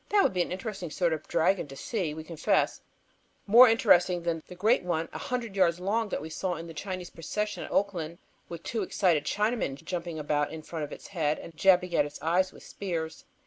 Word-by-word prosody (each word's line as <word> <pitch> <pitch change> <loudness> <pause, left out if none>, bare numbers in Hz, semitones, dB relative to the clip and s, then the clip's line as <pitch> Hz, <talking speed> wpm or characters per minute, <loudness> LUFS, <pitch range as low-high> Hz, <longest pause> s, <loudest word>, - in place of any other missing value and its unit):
That 405 -1 +5
would - - +2
be 180 - +1
an - - -2
interesting 190 -2 -4
sort 170 +1 +1
of 155 -1 -5
dragon 175 0 +2
to 135 - -10
see, 175 - -2
we 160 - -6
confess, 160 0 0 0.6
more 235 +4 +9
interesting 180 -5 +4
than 165 -1 -1
the 180 - -10
great 215 +7 +3
one, 165 -2 -1
a - - -5
hundred 240 -5 -3
yards 175 -3 +3
long, 210 +4 0
that 150 - -3
we 160 - -6
saw 180 +2 -2
in 165 +1 -7
a 165 - -8
Chinese 185 +1 -5
procession 210 +6 -3
in - - -9
Oakland, 170 -5 -1 0.3
with 170 -1 -7
two 225 - -2
excited 175 -6 +1
Chinamen 210 - 0
jumping 170 -2 -4
about 150 -1 0
in 160 -1 -7
front 160 -1 -4
of 145 - -13
its - - -9
head 155 -5 0
and 165 - -10
jabbing 180 +1 +4
at 155 - +3
its 145 - -10
eyes 180 +3 +1
with - - -15
spears. 165 -5 -5
175 Hz, 220 wpm, -29 LUFS, 160-195 Hz, 0.6 s, more